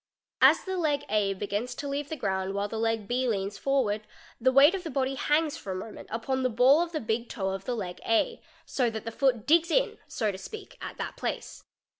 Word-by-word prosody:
As - - +7
the 380 -1 -3
leg 295 -4 0
A 200 -2 +1
begins 205 +5 -3
to 285 - -5
leave 280 +1 -3
the 315 - -3
ground 195 -6 -2
while 200 0 0
the 220 +1 -4
leg 225 -2 0
B 250 +3 0
leans 200 -3 -2
fc - - -25
ward, 240 -7 +2 0.4
the 260 +2 +4
weight 280 +6 +7
of 380 -2 -3
the 330 - -4
body 270 -1 0
hangs 295 +2 +1
for 195 - -5
1 - - -4
moment 215 +3 -8
upon 260 +4 -1
the 255 - +2
ball 255 +7 +5
of 345 -1 -2
the 315 - -2
big 230 0 -2
toe 190 -2 -2
of 195 0 -6
he - - 0
leg 185 -7 -4
A, 345 - +1 0.2
so 250 -3 +1
that 220 -1 -6
the 230 - -3
foot 245 -3 +1
digs 335 +2 +4
in - - +1
so 215 -3 -1
to 195 - -7
eak, - - -14
at - - -6
that - - -5
place. - - -4
245 Hz, 240 wpm, -28 LUFS, 205-285 Hz, 0.4 s, As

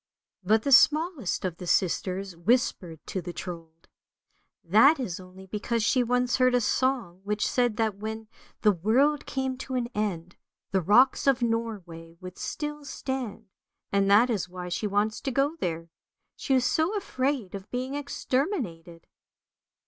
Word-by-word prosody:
" - - -60
But 220 0 +4
the 280 - -1
smallest 300 - +4
of 175 -2 -3
the 180 - -8
sisters 185 +1 0
whispered 175 - 0
to 185 - -4
the 175 0 -6
Trold, 165 -1 -9 0.4
" - - -46 0.2
that 280 +5 +7
is 190 -9 -4
only 185 +1 -13
because 220 +3 -2
she 250 +4 +3
once 250 0 +1
heard 255 -1 +4
a - - +4
song 235 -7 0
which 210 +1 -1
said 245 -4 +1
that 220 -3 0
when 220 +1 -6 0.3
the 210 - +5
world 250 - +2
came 265 -1 -2
to 260 0 -5
an 240 -1 -1
end, 180 -5 -3 0.3
the 190 - +2
rocks 240 - +4
of 265 -3 +3
Norway 190 -8 -3
would 185 0 -10
still 295 0 -4
stand, 265 -5 -5 0.5
and 195 0 +2
that 225 +5 +5
is 190 -5 -2
why 180 0 -7
she 180 +5 -2
wants 205 +2 0
to - - -2
go 275 +4 +1
there, 165 - -4 0.4
she 270 - 0
is 255 -1 +2
so 320 +10 +1
afraid 260 - -2
of 195 +1 -8
being 255 +2 -3
exterminated." 255 - -3
220 Hz, 165 wpm, -27 LUFS, 185-260 Hz, 0.5 s, that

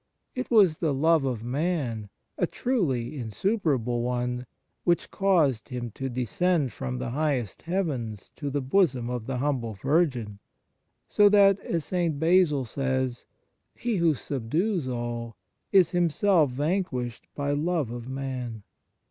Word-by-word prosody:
It 255 0 -4
was 195 -9 +5
the 155 -5 +1
love 160 +1 +3
of 120 -4 -2
man, 130 - -2 0.3
a - - +1
truly 145 - -1
insuperable 125 - 0
one, 125 0 -2 0.4
which 175 -1 +1
caused 160 - +2
Him 120 -3 -4
to 135 +5 -4
descend 135 - 0
from 130 -1 -4
the 125 -1 -3
highest 135 -7 -1
heavens 140 - -3
to 145 - -3
the 140 0 -2
bosom 130 -5 +2
of 120 -3 -4
the 130 -1 -2
humble 125 -4 -1
Virgin, 130 - 0 0.7
so 205 0 +5
that, 200 -1 +5
as 165 -5 -2
St. 170 -5 0
Basil 160 -5 +3
says, 130 0 -2 0.5
He 235 -3 -1
who 165 -3 +3
subdues 150 - -1
all 120 -2 -4 0.4
is 190 -4 +5
Himself 175 - +3
vanquished 130 -4 -2
by 145 0 -1
love 150 -3 0
of 120 +1 -6
man. 130 -5 -4
135 Hz, 135 wpm, -27 LUFS, 120-170 Hz, 0.7 s, was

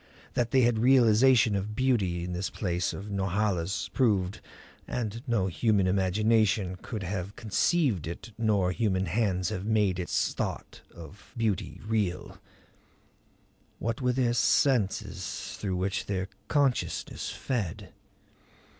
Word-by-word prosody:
That 120 -1 0
they 130 +2 +4
had 120 -2 +3
realization 120 -2 +5
of 100 +2 -3
beauty 105 -9 +1
this 90 +1 -3
palace 90 -3 -1
of 100 +2 -7
Norhala's 100 -1 -1
proved 105 -6 +1 0.5
and 115 -2 -3
no 115 -6 +1
human 100 +1 +1
imagination 100 +1 +2
could 110 +1 -6
have 95 +1 -4
conceived 110 - +1
it 85 +7 -7
nor 105 -5 +1
human 95 -3 0
hands 95 0 0
have 100 -4 -4
made 105 -4 +1
its 90 - 0
thought - - -4
of 85 +5 -13
beauty 105 -5 -1
real. 105 -5 -2 1.4
What 115 +5 -3
were 125 -1 +2
their 125 -2 +1
senses 105 -8 0
through 95 -3 -2
which 95 +2 -2
their 95 -1 -2 0.2
consciousness 140 -4 0
fed? 110 -11 -4
105 Hz, 120 wpm, -28 LUFS, 95-115 Hz, 1.4 s, realization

